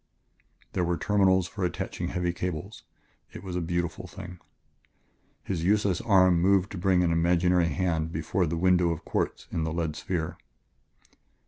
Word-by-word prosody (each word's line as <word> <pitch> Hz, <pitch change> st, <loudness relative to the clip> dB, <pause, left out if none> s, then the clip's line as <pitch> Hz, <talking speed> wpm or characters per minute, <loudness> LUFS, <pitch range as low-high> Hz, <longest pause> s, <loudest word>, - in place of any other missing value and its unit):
There 90 Hz, -, 0 dB
were 85 Hz, 0 st, 0 dB
terminals 95 Hz, 0 st, +3 dB
for 95 Hz, +2 st, -5 dB
attaching 85 Hz, 0 st, -3 dB
heavy 90 Hz, -1 st, -1 dB
cables; 90 Hz, +3 st, -5 dB, 0.5 s
it -, -, -9 dB
was 90 Hz, -2 st, -5 dB
a 90 Hz, -, -1 dB
beautiful 85 Hz, +1 st, -3 dB
thing.... 90 Hz, +2 st, -10 dB, 1.0 s
His 85 Hz, -4 st, -3 dB
useless 100 Hz, -1 st, +2 dB
arm 95 Hz, -5 st, +4 dB
moved 95 Hz, +1 st, +3 dB
to 100 Hz, -, -5 dB
bring 90 Hz, -1 st, +3 dB
an 85 Hz, -, +2 dB
imaginary 85 Hz, +1 st, +3 dB
hand 80 Hz, 0 st, -1 dB
before 80 Hz, +3 st, -1 dB
the 85 Hz, -, -2 dB
window 90 Hz, 0 st, +3 dB
of 80 Hz, 0 st, -4 dB
quartz -, -, -2 dB
in 80 Hz, -, -1 dB
the 80 Hz, -, -2 dB
lead 80 Hz, -2 st, -2 dB
sphere. 85 Hz, -1 st, -3 dB
90 Hz, 155 wpm, -27 LUFS, 85-95 Hz, 1.0 s, arm